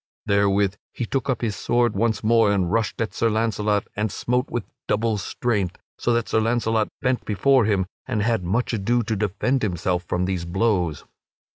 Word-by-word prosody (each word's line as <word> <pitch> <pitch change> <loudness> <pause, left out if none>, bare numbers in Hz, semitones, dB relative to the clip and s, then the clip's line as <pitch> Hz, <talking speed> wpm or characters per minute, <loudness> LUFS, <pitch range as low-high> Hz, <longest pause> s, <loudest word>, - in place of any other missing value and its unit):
Therewith 100 0 +2
he 120 - -3
took 135 +3 -2
up 125 -4 0
his 110 -3 0
sword 120 +4 +1
once 110 +2 0
more 110 -1 +4
and 95 -4 +1
rushed 110 0 0
at 110 -4 -2
Sir 115 - +1
Launcelot 105 -2 0
and 105 0 -1
smote 125 +6 -1
with 120 - -2 0.2
double 110 0 +1
strength, 100 -4 -1 0.2
so 120 - 0
that 115 -1 0
Sir - - +2
Launcelot 110 -1 +1 0.2
bent 125 -1 +1
before 130 +4 +3
him 100 -3 +1 0.2
and 105 -2 0
had 115 -3 +1
much 115 +9 0
ado 115 +3 +1
to 110 0 -1
defend 105 +6 0
himself 90 -2 0
from 90 +1 -1
these 95 -2 -2
blows. 90 -4 0
110 Hz, 180 wpm, -23 LUFS, 100-115 Hz, 0.2 s, more